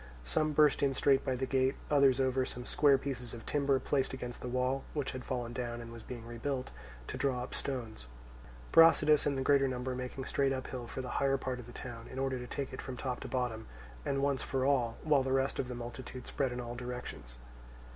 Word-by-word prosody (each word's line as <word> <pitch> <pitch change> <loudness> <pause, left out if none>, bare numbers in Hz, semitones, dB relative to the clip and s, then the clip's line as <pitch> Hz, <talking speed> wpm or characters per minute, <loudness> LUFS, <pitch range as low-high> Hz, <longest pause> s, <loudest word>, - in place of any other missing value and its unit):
Some 155 - +1
burst 150 -1 +5
in 135 -1 +2
straight 135 0 +4
by 130 - 0
the 130 +1 -1
gate, 130 +1 +2 0.2
others 140 -3 +5
over 130 0 +2
some 125 -1 -6
square 140 0 +5
pieces 125 -3 -5
of 115 - -10
timber 140 -2 +2
placed 135 0 0
against 125 -2 -6
the - - -4
wall 130 +2 0
(which 145 -3 -1
has 130 - -5
fallen 120 -2 -3
down 120 -1 -3
and 115 0 -8
was 115 - -9
being 120 0 -8
rebuilt) 125 +3 -3 0.3
to - - -5
draw 130 -3 +1
up - - -7
stones; 115 - -4 0.6
Brasidas 155 -2 +7
and 140 -2 +1
the 135 - 0
greater 140 0 +4
number 130 0 -2
making 125 +1 -5
straight 135 0 +1
uphill 130 -2 -5
for 130 - -4
the 125 - -5
higher 135 0 +3
part 130 -1 -3
of 120 - -9
the - - -10
town, 120 -2 -8
in - - -9
order 135 -1 0
to 125 - -6
take 140 +1 -4
it - - -5
from 130 -2 -6
top 125 -1 -3
to - - -6
bottom, 120 -4 -2 0.4
and 140 0 0
once 140 -2 +1
for 130 -1 -1
all, 125 -5 +2
while 150 -3 +4
the 130 0 -1
rest 135 +1 +1
of 130 - 0
the 125 - -5
multitude 120 +1 -7
spread 135 -3 -1
in 125 - -4
all 120 -1 -4
directions. 120 - -6
130 Hz, 225 wpm, -33 LUFS, 125-135 Hz, 0.6 s, Brasidas